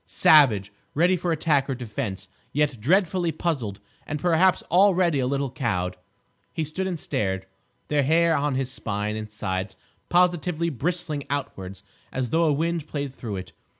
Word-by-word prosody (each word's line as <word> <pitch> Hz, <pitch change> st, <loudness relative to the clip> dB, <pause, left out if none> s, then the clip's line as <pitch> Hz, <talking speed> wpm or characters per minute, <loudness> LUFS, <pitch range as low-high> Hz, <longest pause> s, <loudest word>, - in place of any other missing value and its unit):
Savage, 110 Hz, -10 st, +5 dB, 0.2 s
ready 175 Hz, +5 st, +4 dB
for 175 Hz, 0 st, -2 dB
attack 150 Hz, -3 st, +1 dB
or 135 Hz, -, 0 dB
defence, 110 Hz, -5 st, -5 dB, 0.2 s
yet 145 Hz, -5 st, 0 dB
dreadfully 175 Hz, -, +2 dB
puzzled 140 Hz, -, -2 dB, 0.3 s
and 150 Hz, -, -3 dB
perhaps 180 Hz, +2 st, +3 dB
already 180 Hz, -4 st, +4 dB
a 125 Hz, -, +1 dB
little 140 Hz, -1 st, -1 dB
cowed, 95 Hz, -9 st, -1 dB, 0.6 s
he 160 Hz, -, -2 dB
stood 170 Hz, +5 st, -3 dB
and 175 Hz, -3 st, -3 dB
stared, 95 Hz, -7 st, -2 dB, 0.4 s
the 150 Hz, -1 st, +2 dB
hair 165 Hz, +4 st, +3 dB
on 145 Hz, -1 st, 0 dB
his 130 Hz, -1 st, -1 dB
spine 105 Hz, -4 st, -3 dB
and 110 Hz, 0 st, -5 dB
sides 95 Hz, -2 st, -4 dB, 0.3 s
positively 175 Hz, -1 st, +2 dB
bristling 150 Hz, +1 st, -2 dB
outwards 100 Hz, -9 st, -4 dB, 0.3 s
as 125 Hz, -3 st, -2 dB
though 165 Hz, +1 st, +3 dB
a 155 Hz, -, +3 dB
wind 165 Hz, +1 st, -1 dB
played 140 Hz, -3 st, -4 dB
through 115 Hz, -6 st, -6 dB
it. 95 Hz, -1 st, -7 dB
145 Hz, 155 wpm, -25 LUFS, 110-170 Hz, 0.6 s, Savage